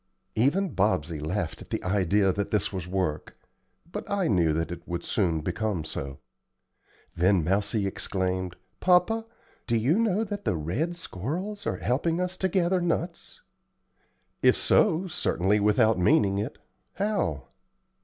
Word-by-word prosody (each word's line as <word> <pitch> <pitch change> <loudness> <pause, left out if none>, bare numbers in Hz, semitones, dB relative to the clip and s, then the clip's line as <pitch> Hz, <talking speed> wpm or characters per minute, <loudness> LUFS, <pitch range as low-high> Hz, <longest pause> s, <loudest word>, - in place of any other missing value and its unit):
Even 155 - +2
Bobsey 90 -6 +1
laughed 80 +3 -3
at - - -12
the - - -3
idea 95 0 +2
that 100 +1 -2
this 105 -1 0
was 90 -2 -4
work; 90 -5 -2 0.5
but 210 +2 -6
I 200 -3 +1
knew 85 -6 +3
that 80 +2 -1
it 85 -1 -8
would 85 -1 -3
soon 85 -7 0
become 105 0 -2
so. 70 -2 -5 1.0
Then 90 0 +3
Mousie 100 +4 +1
exclaimed, 95 -2 -2 0.2
"Papa, 185 +5 +3 0.4
do 115 - +2
you 135 - +2
know 220 -2 +2
that 205 -1 -5
the 95 - 0
red 115 - -2
squirrels 175 - -5
are - - -1
helping 165 +8 0
us 180 0 -2
to 190 - 0
gather 180 0 +2
nuts?" 170 - -3 1.0
"If - - +5
so, 185 -3 +3
certainly 105 - +1
without 105 0 +3
meaning 100 - +3
it. 110 +7 -4 0.4
How?" 195 - -1
105 Hz, 145 wpm, -27 LUFS, -, 1.0 s, If